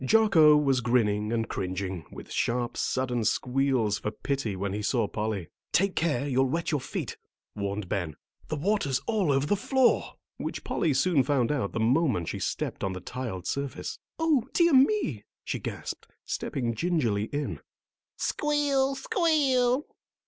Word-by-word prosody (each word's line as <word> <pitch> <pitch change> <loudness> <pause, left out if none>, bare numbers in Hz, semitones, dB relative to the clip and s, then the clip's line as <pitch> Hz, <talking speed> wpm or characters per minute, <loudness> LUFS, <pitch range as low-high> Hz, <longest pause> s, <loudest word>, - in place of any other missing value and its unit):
Jocko 160 -4 +6
was 135 -4 +2
grinning 110 -3 +1
and 115 -1 0
cringing, 95 -3 -3
with - - -10
sharp, 120 0 -1
sudden 125 -3 -1
squeals 125 -1 +1
for - - -2
pity 125 -2 -2
when 95 +1 -3
he 105 - -2
saw 115 0 +1
Polly. 105 -5 -3 0.2
"Take 195 +1 +2
care, 145 -5 0
you'll 135 -1 +2
wet 165 +4 -1
your 150 -3 0
feet," - - -5 0.4
warned 100 -1 -3
Ben. 85 -6 -2 0.3
"The - - -2
water's 150 -4 +1
all 210 -9 +1
over 135 +1 +2
the 205 - +2
floor." 255 +4 +2 0.2
Which - - -5
Polly 155 -5 0
soon 145 +2 +3
found 130 -2 +1
out 135 -9 -1
the - - -2
moment 115 - +2
she - - -4
stepped - - -3
on 95 -1 -1
the 95 - -5
tiled 95 -3 -5
surface. 140 +6 -3 0.2
"O 315 -7 +2
dear 340 -2 +4
me!" 265 - +3 0.2
she - - -3
gasped, - - -6 0.2
stepping 120 -3 -2
gingerly 115 - 0
in. 145 +4 -3 0.6
Squeal! 285 -2 +1
Squeal! 275 - +2
135 Hz, 155 wpm, -28 LUFS, -, 0.6 s, Jocko